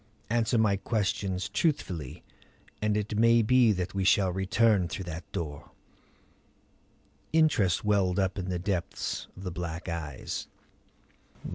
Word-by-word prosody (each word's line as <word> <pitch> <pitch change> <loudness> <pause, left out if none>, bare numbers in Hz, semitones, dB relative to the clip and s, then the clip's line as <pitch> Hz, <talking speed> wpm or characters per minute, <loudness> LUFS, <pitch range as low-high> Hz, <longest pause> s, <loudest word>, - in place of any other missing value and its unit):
Answer 115 0 +2
my 105 -3 +3
questions 100 -3 -1
truthfully 100 - -2 0.6
and 105 0 +1
it 105 0 -2
may 115 0 +5
be 125 0 +5
that 90 -2 -2
we 95 -1 -1
shall 95 0 +4
return 95 +1 +2
through 95 - -5
that 85 0 -7
door." 75 -4 -5 1.6
Interest 125 - +3
welled 100 -3 +2
up 95 0 0
in 95 0 -4
the 90 - -1
depths 90 -1 -3
of 95 - -9
the 90 - -4
black 85 -1 -5
eyes. 80 -5 -4
95 Hz, 130 wpm, -29 LUFS, 90-110 Hz, 1.6 s, may